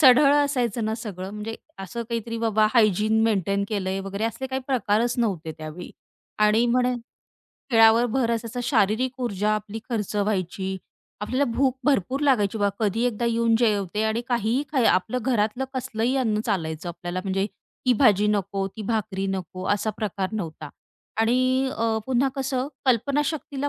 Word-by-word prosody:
सढळ 280 +1 +7
असायचं 250 -6 +1
ना 220 - -1
सगळं 195 -4 -6
म्हणजे 210 +2 -5 0.3
असं 235 +5 -5
काहीतरी 230 -1 -3
बाबा 220 -1 +3
हायजीन 215 0 +3
मेंटेन 200 -2 +1
केलंय 195 -2 -2
वगैरे 195 +2 -4
असले 230 +4 -3
काही 265 0 -3
प्रकारच 235 -2 +1
नव्हते 180 -9 -1
त्यावेळी 155 +3 -8 0.5
आणि 210 +2 +4
म्हणे 250 +1 +2 0.8
खेळावर 225 0 +6
भर 250 -3 +1
असायचा 230 +1 -2
शारीरिक 245 +2 +1
ऊर्जा 210 -4 0
आपली 215 +1 -5
खर्च 215 -4 -2
व्हायची, 190 -2 -1 0.4
आपल्याला 255 +7 0
भूक 265 -1 +2
भरपूर 270 -1 +1
लागायची 225 -8 +2
बा, 205 -1 +2
कधी 220 +1 0
एकदा 235 0 -2
येऊन 230 -1 +2
जेवते 210 -3 +1
आणि 220 +1 0
काहीही 240 +3 +1
काय 260 -5 +2
आपलं 220 +7 +2
घरातलं 240 0 0
कसलंही 245 +1 -1
अन्न 220 -5 +1
चालायचं 170 -5 -2
आपल्याला. 175 +1 -4
म्हणजे 195 +1 0 0.4
ती 250 - +6
भाजी 210 -4 +4
नको 195 -1 0
ती 220 - -5
भाकरी 205 -3 -2
नको 185 0 -6
असा 210 +1 0
प्रकार 195 -3 -2
नव्हता 160 -7 -5 0.5
आणि 255 +3 +2
अ, 225 -1 +1
पुन्हा 260 +1 +2
कसं 265 0 -1 0.2
कल्पनाशक्तीला 285 +3 0
220 Hz, 150 wpm, -24 LUFS, 200-245 Hz, 0.8 s, सढळ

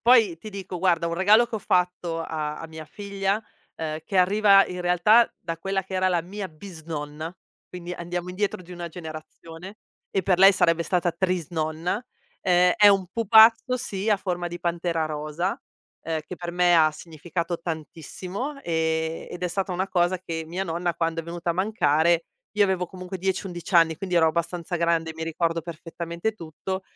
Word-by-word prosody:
Poi 225 -8 +5
ti 215 - -9
dico, 190 -3 -6
guarda 170 -2 +2
un 170 - -2
regalo 210 +6 +5
che 230 - -7
ho - - -3
fatto 180 -3 0
a 150 -2 -4
a 165 - -7
mia 160 -1 -10
figlia, 200 +3 -2 0.3
ehm, 155 -1 -4
che 195 - -4
arriva 195 +2 +6
in 180 0 -6
realtà 180 +7 +4
da 165 -1 -5
quella 195 +2 -1
che 190 - -12
era 185 0 +2
la 175 -2 +1
mia 195 +2 -6
bisnonna, 155 -2 -7 0.4
quindi 180 -1 -7
andiamo 175 +1 -4
indietro 190 0 -2
di 180 +1 -12
una 175 -1 -6
generazione 165 +3 -10 0.3
e 195 - 0
per 180 -1 +2
lei 195 +1 +8
sarebbe 170 -2 +2
stata 175 +1 0
trisnonna, 170 +1 -2 0.4
ehm, 180 0 +4
è 205 - +8
un 195 -2 +3
pupazzo, 225 +3 +6
sì, 205 -4 -4
a 210 - +4
forma 175 -2 -3
di 175 - -7
pantera 170 -1 -1
rosa, 155 +4 -3 0.4
ehm, 160 -1 -2
che 180 - -6
per 175 0 -6
me 175 0 +3
ha 155 -2 +5
significato 170 +2 -5
tantissimo, 180 - -5
ehm, 160 -2 -1
ed 180 - -8
è 180 - +1
stata 190 +2 -2
una 185 +2 -1
cosa 180 -1 +1
che 165 -3 -5
mia 180 +4 -3
nonna 170 0 -2
quando 165 0 -1
è - - -11
venuta 170 +1 -3
a - - +2
mancare, 170 -4 +2 0.3
io 210 -1 +4
avevo 190 -2 0
comunque 185 +1 -8
10, 190 +2 -1
11 175 0 -7
anni, 165 -1 +5
quindi 180 +1 -2
ero 165 -1 +5
abbastanza 170 +1 -2
grande 170 -1 +1
e - - -6
mi 160 - -6
ricordo 165 +1 -1
perfettamente 170 +4 -5
tutto, 190 +1 -6
175 Hz, 185 wpm, -25 LUFS, 165-190 Hz, 0.4 s, lei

